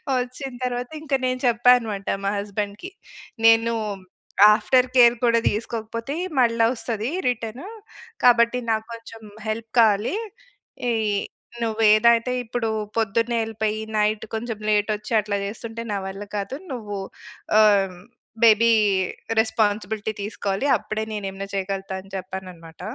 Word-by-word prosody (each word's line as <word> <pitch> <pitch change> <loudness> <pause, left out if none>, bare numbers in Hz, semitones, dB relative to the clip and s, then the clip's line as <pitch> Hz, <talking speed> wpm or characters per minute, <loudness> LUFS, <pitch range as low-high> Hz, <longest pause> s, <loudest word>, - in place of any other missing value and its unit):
వచ్చిన 255 +2 -3
తరువాతింక 255 +5 -4
నేను 255 0 -1
చెప్పా 240 +1 +5
అనమాట. 210 -4 -5 0.2
మా 200 - +1
హస్బాండ్‌కి, 205 - -4 0.6
నేను 225 +1 +5 0.8
ఆఫ్టర్ 250 +4 +3
కేర్ 240 -1 +7
కూడా 230 -1 +4
తీసుకోకపోతే 230 +3 -4 0.3
మళ్ళా 230 -2 +3
ఒస్తది 230 -1 -3 0.2
రిటను. 245 - -3 0.6
కాబట్టి, 235 0 +5
నాకు 220 -1 0
కొంచెం 230 -1 -11 0.3
హెల్ప్ 225 +1 -3
కావాలి. 215 - +3 0.7
ఇయ్యి, 215 -3 +1 0.4
నువ్వేదైతే 225 +2 +4
ఇప్పుడు 230 0 -2 0.3
పొద్దున్నే 230 +2 +1
యెళ్ళిపోయి, 220 -1 -2 0.2
నైట్ 210 0 +1
కొంచెం 225 0 -4
లేటొచ్చి, 210 +1 0
అట్లా 205 -1 -2
జేస్తుంటే 225 +2 -6
నా - - -1
వల్ల 195 +1 -6
కాదు. 200 +6 -4
నువ్వు 210 -5 -5 0.6
ఆహ్, 215 -1 +7 0.2
హ్మ్, 180 -1 -14 0.4
బేబీ 230 +1 +6 0.7
రెస్పాన్సిబిలిటీ 215 -1 0
తీసుకోవాలి. 200 +1 -3
అప్పుడే 215 +1 -4
నేనేమన్నా 195 -1 -5
చేయగలతా 195 0 -3
అని 195 +1 -18
చెప్పాననమాట. 185 -3 -9
220 Hz, 115 wpm, -23 LUFS, 205-235 Hz, 0.8 s, కేర్